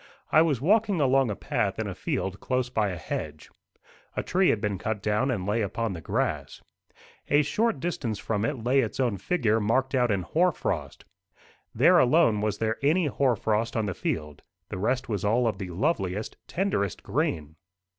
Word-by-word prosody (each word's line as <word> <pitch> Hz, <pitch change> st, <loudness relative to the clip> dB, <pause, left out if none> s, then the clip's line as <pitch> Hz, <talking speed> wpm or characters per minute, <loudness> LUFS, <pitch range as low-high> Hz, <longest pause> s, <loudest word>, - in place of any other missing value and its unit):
I 155 Hz, -, +6 dB
was 155 Hz, -7 st, +2 dB
walking 205 Hz, -, +2 dB
along 135 Hz, -2 st, +3 dB
a 105 Hz, -, -2 dB
path -, -, -1 dB
in -, -, -2 dB
a -, -, -4 dB
field 95 Hz, +1 st, -3 dB
close 125 Hz, -1 st, -1 dB
by 110 Hz, -4 st, +1 dB
a 90 Hz, -, -4 dB
hedge. 75 Hz, -1 st, -6 dB, 0.7 s
A -, -, 0 dB
tree 185 Hz, +1 st, +2 dB
had 110 Hz, -, +2 dB
been 100 Hz, -2 st, -2 dB
cut 110 Hz, +2 st, -2 dB
down, 105 Hz, +6 st, +1 dB
and 105 Hz, -8 st, -1 dB
lay 105 Hz, +3 st, 0 dB
upon 110 Hz, +1 st, -2 dB
the 85 Hz, -, -7 dB
grass. -, -, -2 dB, 0.7 s
A 145 Hz, +1 st, +4 dB
short 225 Hz, +1 st, 0 dB
distance 130 Hz, -, -2 dB
from 105 Hz, -1 st, -2 dB
it 130 Hz, -2 st, -2 dB
lay 130 Hz, +3 st, +3 dB
its 115 Hz, -2 st, -1 dB
own 120 Hz, -6 st, +1 dB
figure 110 Hz, -, +1 dB
marked 130 Hz, +6 st, +1 dB
out 125 Hz, -2 st, +2 dB
in 100 Hz, -3 st, 0 dB
hoar 175 Hz, -, +2 dB
frost. -, -, -4 dB, 0.7 s
There -, -, +6 dB
alone 125 Hz, -5 st, +4 dB
was 105 Hz, -1 st, -1 dB
there 110 Hz, 0 st, -1 dB
any 160 Hz, +5 st, +3 dB
hoar 135 Hz, -3 st, +1 dB
frost 110 Hz, +2 st, -1 dB
on 110 Hz, -, +1 dB
the 95 Hz, -, -2 dB
field; 75 Hz, -4 st, -4 dB, 0.3 s
the 95 Hz, -, -5 dB
rest 125 Hz, +5 st, 0 dB
was 105 Hz, -5 st, -2 dB
all 115 Hz, +4 st, +2 dB
of 105 Hz, -4 st, -2 dB
the 95 Hz, -2 st, -5 dB
loveliest 100 Hz, -, -1 dB
tenderest 170 Hz, -, -1 dB
green. 80 Hz, -1 st, -2 dB
115 Hz, 190 wpm, -27 LUFS, 100-135 Hz, 0.7 s, I